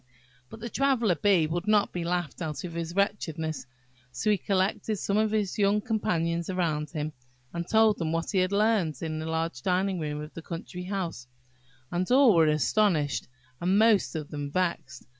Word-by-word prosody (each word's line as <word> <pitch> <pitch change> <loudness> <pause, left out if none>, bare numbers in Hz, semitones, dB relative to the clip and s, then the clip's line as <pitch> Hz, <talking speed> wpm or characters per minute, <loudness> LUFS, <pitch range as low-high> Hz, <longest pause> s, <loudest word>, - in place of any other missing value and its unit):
But 225 - -11
the 235 - -4
Traveller 260 -8 +2
bee 175 0 +3
would 175 +5 -3
not 210 -1 +3
be 175 - -2
laughed 175 -2 -2
out 155 -3 -4
of 175 -2 -6
his 170 +1 -4
wretchedness; 160 -8 -1 0.4
so 215 - 0
he 205 - +3
collected 200 +3 0
some 200 - -1
of 215 0 +3
his 210 -2 -1
young 200 +1 +3
companions 170 -6 -1
around 160 -5 -1
him, 155 -1 -4 0.4
and 170 0 -4
told 220 -1 +4
them 160 -2 -1
what 165 0 -1
he 195 - +2
had 185 0 +2
heard 200 - +1
in 155 -1 -3
the 160 - -4
large 160 -4 -2
dining 185 +3 0
room 150 -2 -3
of 150 +1 -8
the 165 - -7
country 175 +2 -7
house; 180 -9 -4 0.6
and 180 +1 -1
all 255 -2 +6
were 165 -2 +5
astonished, 155 -1 +1 0.3
and 185 +3 +2
most 215 -5 +4
of 150 -2 -5
them 145 -2 -4
vexed. 160 -6 -2
175 Hz, 185 wpm, -28 LUFS, 160-205 Hz, 0.6 s, all